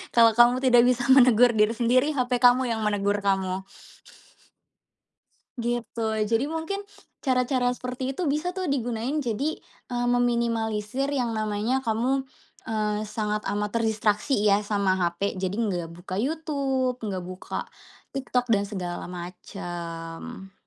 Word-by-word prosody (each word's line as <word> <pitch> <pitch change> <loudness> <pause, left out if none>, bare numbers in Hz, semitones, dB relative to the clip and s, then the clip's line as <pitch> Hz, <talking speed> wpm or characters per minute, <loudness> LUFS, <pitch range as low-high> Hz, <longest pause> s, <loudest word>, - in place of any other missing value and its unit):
Kalau 230 -1 +7
kamu 240 +3 +4
tidak 245 -1 +6
bisa 250 -1 +2
menegur 245 -2 +7
diri 215 +1 +3
sendiri 255 +5 +2
HP 250 -1 0
kamu 245 0 +5
yang 220 - -1
menegur 205 -1 +1
kamu. 190 -1 0 2.0
Gitu, 235 -1 -3 0.3
jadi 230 +4 +2
mungkin 325 +6 -4 0.3
cara-cara 250 -1 +1
seperti 255 +2 -4
itu 330 -1 -1
bisa 315 +5 -1
tuh 370 -5 -3
digunain 245 +1 -1
jadi, 275 +3 -1 0.3
eee, 245 0 -1
meminimalisir 235 0 0
yang 250 -5 -1
namanya 215 +4 -1
kamu, 250 +3 0 0.5
eee, 210 -1 0
sangat 210 -1 -2 0.2
amat 210 0 -1
terdistraksi 215 +3 +1
ya 205 0 +4
sama 200 -2 +1
HP, 175 +3 0
jadi 190 +3 -2
nggak 180 -7 -1
buka 185 +1 -8
YouTube, 270 -4 -1
nggak 190 -4 -3
buka 185 +1 -5 0.5
TikTok, 250 -2 -1
dan 200 -1 +1
segala 180 -3 -5
macam. 175 +2 -7
235 Hz, 130 wpm, -26 LUFS, 205-255 Hz, 2.0 s, Kalau